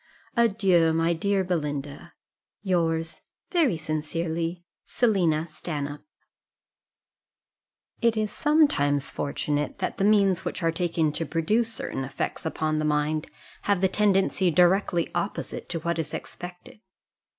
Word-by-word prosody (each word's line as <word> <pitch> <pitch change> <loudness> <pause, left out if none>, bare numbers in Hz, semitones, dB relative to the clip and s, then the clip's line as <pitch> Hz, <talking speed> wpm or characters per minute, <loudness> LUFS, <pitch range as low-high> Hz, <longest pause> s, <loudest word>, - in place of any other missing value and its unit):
"Adieu, 195 -8 +3
my 165 +1 +2
dear 195 +3 +1
Belinda, 150 -5 -3 0.5
"Yours, 165 -4 0 0.3
very 310 - +3
sincerely, 165 +2 -3 0.2
"SELINA 175 -9 +2
STANHOPE." 150 -2 -5 2.0
It 230 -1 +3
is 215 -1 0
sometimes 285 - +2
fortunate, 145 +1 -2
that 190 - -3
the - - +2
means 200 -3 +4
which 185 - -4
are 165 - +3
taken 165 -2 0
to 165 - -3
produce 215 +8 +1
certain 135 -10 -4
effects 135 +4 -3
upon 155 -1 -1
the - - -1
mind 150 0 0 0.4
have 200 -2 +1
a - - +6
tendency 195 -1 +2
directly 175 +1 +3
opposite 175 +4 -3
to 170 - -2
what 170 0 -1
is 150 -2 -3
expected. 180 +3 -9
170 Hz, 120 wpm, -26 LUFS, 155-195 Hz, 2.0 s, a